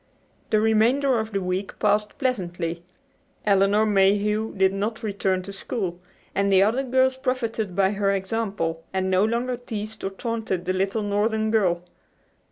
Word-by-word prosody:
The 215 - +3
remainder 230 +4 +3
of 220 0 -4
the 195 -2 -1
week 185 +2 -3
passed 210 0 +1
pleasantly. 175 - -2 0.6
Elinor 200 +1 +4
Mayhew 210 +2 +2
did 190 0 +3
not 215 +4 -3
return 195 -3 -1
to 200 - -8
school, 190 -3 -4 0.3
and 200 0 +1
the 190 0 +6
other 225 +6 +2
girls 260 0 +2
profited 230 -7 -2
by 195 0 +3
her 200 -1 0
example 195 -5 -2
and 190 0 0
no 185 +1 +4
longer 240 +3 0
teased 220 -2 -6
or 195 - -1
taunted 215 -3 -3
the 185 - 0
little 195 +3 0
northern 215 +2 0
girl. 180 -6 +2
205 Hz, 155 wpm, -24 LUFS, 190-225 Hz, 0.6 s, the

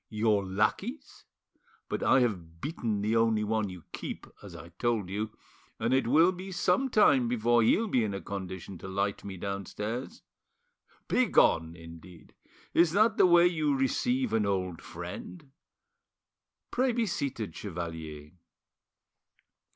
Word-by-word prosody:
Your 105 -1 +1
lackeys? 105 - -2 0.6
But - - -3
I 130 - +4
have 85 -9 -2
beaten 110 - -2
the 110 +2 +1
only 115 -1 +3
one 110 -1 0
you 90 -3 -10
keep, - - -6 0.2
as - - -11
I 85 - -10
told 105 +1 -1
you, 105 +2 -2 0.5
and 115 +3 0
it 130 -3 +2
will 160 +8 +5
be 185 +1 -8
some 185 +9 +1
time 140 - +4
before 120 0 +2
he'll 215 - +3
be 125 - +2
in 100 -2 -2
a - - -3
condition 95 -2 -7
to - - -8
light 100 +1 -2
me 100 -2 -7
downstairs: 105 - -5 0.8
'Begone,' 85 - +3
indeed! 85 0 -13 0.4
Is 170 -1 +4
that 215 +3 +3
the - - +6
way 175 0 +6
you 155 -5 +1
receive 130 -2 0
an 110 -2 +2
old 95 -3 -2
friend? 100 - -9 1.2
Pray 255 0 +1
be 235 -1 +1
seated, 135 - -3
chevalier." 80 -5 -6
110 Hz, 140 wpm, -29 LUFS, 95-145 Hz, 1.2 s, the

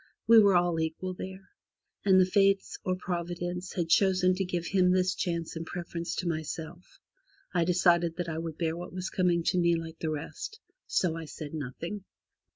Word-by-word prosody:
We 230 0 +8
were 200 -3 +6
all 175 -2 +2
equal 160 +3 -2
there, 190 +1 -8 0.5
and 190 -2 +6
the 185 - +6
Fates, 195 +1 +2
or 185 - 0
Providence, 175 0 -4
had 175 -3 -1
chosen 185 +1 +4
to 190 +1 -1
give 175 -2 -3
him 185 -1 +3
this 185 0 +3
chance 170 -2 -3
in 165 - -4
preference 170 0 -5
to 180 - -2
myself. 160 +1 -5 0.6
I 175 -2 +2
decided 170 -1 +3
that 175 0 -3
I 160 -1 -3
would 165 -1 -5
bear 165 -1 -1
what 175 +1 -7
was 185 0 -4
coming 175 -2 +2
to 180 - +2
me 170 -1 +3
like 165 0 -6
the 160 - -2
rest, 155 - -5 0.3
so 170 -3 +1
I 165 -1 -5
said 150 0 -8
nothing. 160 +7 -5
175 Hz, 185 wpm, -29 LUFS, 165-185 Hz, 0.6 s, We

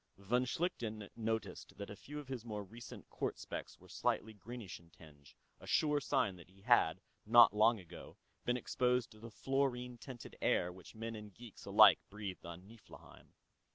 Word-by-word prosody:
Von 120 +6 +1
Schlichten 115 - -2
noticed 110 -3 -3
that 100 0 -6
a - - -7
few 145 +8 -9
of 145 - -9
his 130 -4 -5
more 105 -3 -4
recent 115 +5 -11
quartz - - -3
specks - - -6
were - - -17
slightly 110 +1 -1
greenish 110 -1 -8
in 85 -1 -21
tinge, 75 -3 -17 0.2
a - - -13
sure 150 -1 +3
sign 100 -8 +1
that 85 0 -14
he 95 +1 -21
had, 105 -7 +4 0.2
not 115 0 +8
long 110 +2 +4
ago, 90 -4 -11 0.3
been 125 0 +1
exposed 125 0 +1
to 110 - -15
the 115 +2 -9
fluorine 125 0 -1
tainted 125 -2 -9
air 90 - +2
which 90 +3 -13
men 115 +1 -5
and 105 -3 -10
geeks 120 -4 -12
alike - - +8
breathed 100 -4 -6
on 85 +3 -9
Niflheim. 115 0 -15
110 Hz, 180 wpm, -36 LUFS, 100-125 Hz, 0.3 s, not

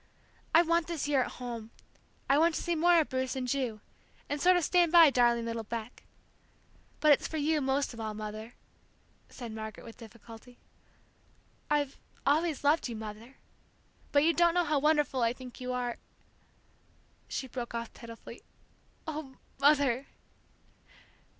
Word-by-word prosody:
I 335 - +8
want 335 0 +1
this 335 -4 -3
year 285 -3 +3
at - - -3
home; 235 -3 -7 0.6
I 275 +2 +4
want 330 0 +3
to - - -2
see 345 - 0
more 340 +1 +4
of 315 - +1
Bruce 260 0 -2
and 255 -1 -3
Ju, 245 -5 -2 0.5
and 290 0 -3
sort 365 0 +5
of 350 - 0
stand 350 0 +3
by 335 -4 +8
darling 240 -2 +3
little 230 0 -3
Beck! 230 +2 -6 1.0
But 305 - +5
it's 285 - +4
for 320 - -5
you, 305 +1 +1
most 270 0 0
of 230 - -10
all, 215 -1 -4
Mother," 215 +2 -7 0.7
said 240 -3 -8
Margaret, 220 -1 -7
with 230 - -12
difficulty. 230 +1 -13 1.1
"I've 290 -2 0 0.3
always 310 +1 +1
loved 290 -1 +2
you, 235 - -5
Mother, 220 +4 -9 0.8
but 285 0 +4
you 335 +2 +4
don't 340 0 +3
know 355 -1 +3
how 300 -2 +1
wonderful 295 -3 +2
I 230 0 +2
think 255 0 -11
you 255 0 -3
are 245 -1 -2 0.7
" - - -36
She 265 - -4
broke 240 -1 -6
off 235 0 -5
pitifully, 230 -1 -11 0.6
"Ah, 310 -4 -6 0.3
Mother!" 280 -3 +3
265 Hz, 160 wpm, -30 LUFS, 235-310 Hz, 1.1 s, I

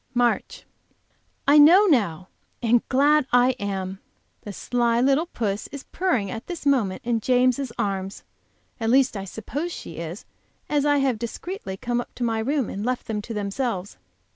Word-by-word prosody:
MARCH. 240 -1 0 0.8
I 290 +2 +7
know 350 +8 +8
now, 195 - +1 0.3
and 235 0 +3
glad 290 +1 +4
I 245 +1 +5
am! 195 -1 -4 0.4
The 205 - -7
sly 235 +3 0
little 275 +6 +2
puss 210 - -3
is 280 -1 -9
purring 290 - 0
at 225 - -7
this 345 -5 -6
moment 235 -10 +1
in 235 -1 +1
James' 255 +2 +2
arms; 195 -1 -3 0.6
at 225 -1 -1
least 265 0 +3
I 195 -1 -4
suppose 280 - -5
she 165 - -8
is, 170 +4 -6 0.4
as 295 -1 +1
I 290 0 +4
have 265 -5 +1
discreetly 235 - -6
come 240 +3 -1
up - - -13
to 245 - -4
my 225 -1 0
room 270 +2 0
and 200 - -5
left 250 +1 -2
them 210 -2 -3
to 230 - -7
themselves. 205 -1 -3
240 Hz, 165 wpm, -24 LUFS, 205-275 Hz, 0.8 s, know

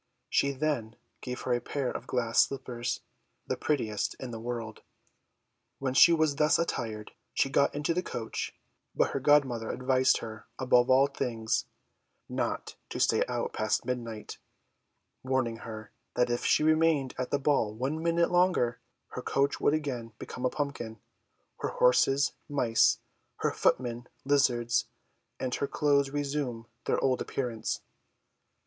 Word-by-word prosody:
She 140 - +3
then 135 -6 -2 0.3
gave 125 -1 -5
her 125 - 0
a 120 - 0
pair 140 -3 -2
of - - -6
glass 115 -2 +3
slippers, 125 -3 -4 0.4
the - - -1
prettiest 115 -9 -1
in 130 -2 -7
the 115 - -6
world. 115 -2 -5 1.0
When 130 -1 -2
she 170 - +8
was 155 -3 +2
thus 150 +1 +4
attired, 110 -10 -3 0.2
she 135 - +2
got 140 - +3
into 150 +3 0
the 180 - 0
coach; 115 -10 -4 0.4
but - - +2
her - - -1
godmother 130 -5 +3
advised 130 0 +3
her, 110 -1 -8
above 125 -1 +3
all 130 +1 +6
things, 120 -5 -1 0.6
not - - -3
to - - -5
stay - - +3
out - - -2
past 110 +2 0
midnight 115 -4 -5 0.8
warning 130 -3 0
her, 110 -2 -8 0.2
that 125 0 +2
if 120 - -1
she - - +3
remained 155 -4 +3
at 125 - -2
the - - +2
ball 135 -6 +2
one 135 +8 -2
minute 170 +1 +2
longer, 175 -10 +2 0.3
her - - -6
coach 140 +1 0
would 150 - +4
again 125 -7 -4
become 125 - -6
a - - +3
pumpkin; 135 -7 -4 0.6
her - - -2
horses, 135 +3 +3 0.2
mice; 115 -4 +3 0.4
her - - +2
footmen, 120 -1 0 0.2
lizards; 120 -4 +2 0.5
and 125 -1 -2
her 140 - -1
clothes 140 -2 +2
resume 140 -5 -2 0.2
their - - +1
old 130 -2 +2
appearance. 120 -4 -3
130 Hz, 145 wpm, -29 LUFS, 115-145 Hz, 1.0 s, she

